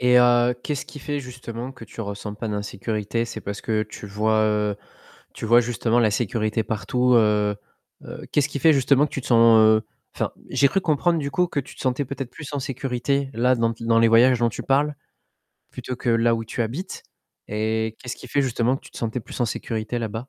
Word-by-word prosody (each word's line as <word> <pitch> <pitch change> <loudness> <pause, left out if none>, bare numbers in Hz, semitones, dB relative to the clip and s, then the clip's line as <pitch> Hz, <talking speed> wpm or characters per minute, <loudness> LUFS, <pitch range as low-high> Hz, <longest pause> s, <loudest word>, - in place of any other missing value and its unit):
Et 125 0 +5
heu, 120 0 +4
qu'est-ce 145 -2 -3
qui 145 - -10
fait 145 +1 -3
justement 125 -1 -7
que 120 -3 -12
tu - - -10
ressens 105 0 -5
pas 110 +1 -5
d'insécurité 105 +2 -2
c'est 115 - -7
parce 100 0 -5
que 110 -1 0
tu 105 - -9
vois, 110 +2 +1
heu, 105 -1 +1 0.6
tu - - -7
vois 120 +2 +6
justement 120 0 0
la 110 -3 +4
sécurité 110 0 -1
partout, 125 +4 0
heu 105 -2 +3 0.5
heu, - - -9
qu'est-ce 145 0 +2
qui 145 - -4
fait 160 +4 +5
justement 140 +1 +3
que - - -13
tu 135 - -3
te - - -10
sens, 115 -2 +6
heu 110 0 +5 0.3
enfin, - - -2 0.2
j'ai 140 - +4
cru 195 - 0
comprendre 165 +1 +1
du 140 -1 -3
coup 180 +4 +2
que 145 - -2
tu 135 - -13
te - - -13
sentais 130 +2 0
peut-être 135 -1 -6
plus 150 -3 -9
en 145 - -2
sécurité 135 +1 -2
là 125 +3 +3
dans 115 -1 0
dans 115 0 +2
les 115 0 +5
voyages 120 +2 +5
dont 120 -1 +2
tu 105 - -6
parles 145 +2 +1 0.8
plutôt 125 - -6
que 125 - -4
là 115 0 +3
où 115 0 -3
tu 115 - -6
habites 140 - -5 0.5
et 110 +1 -1
qu'est-ce 125 -2 -6
qui - - -11
fait 140 +3 +1
justement 125 0 +1
que - - -12
tu - - -14
te - - -10
sentais 115 +1 -2
plus - - -9
en 120 - +3
sécurité 110 +1 -3
là-bas? 110 -3 -4
120 Hz, 220 wpm, -23 LUFS, 110-130 Hz, 0.8 s, vois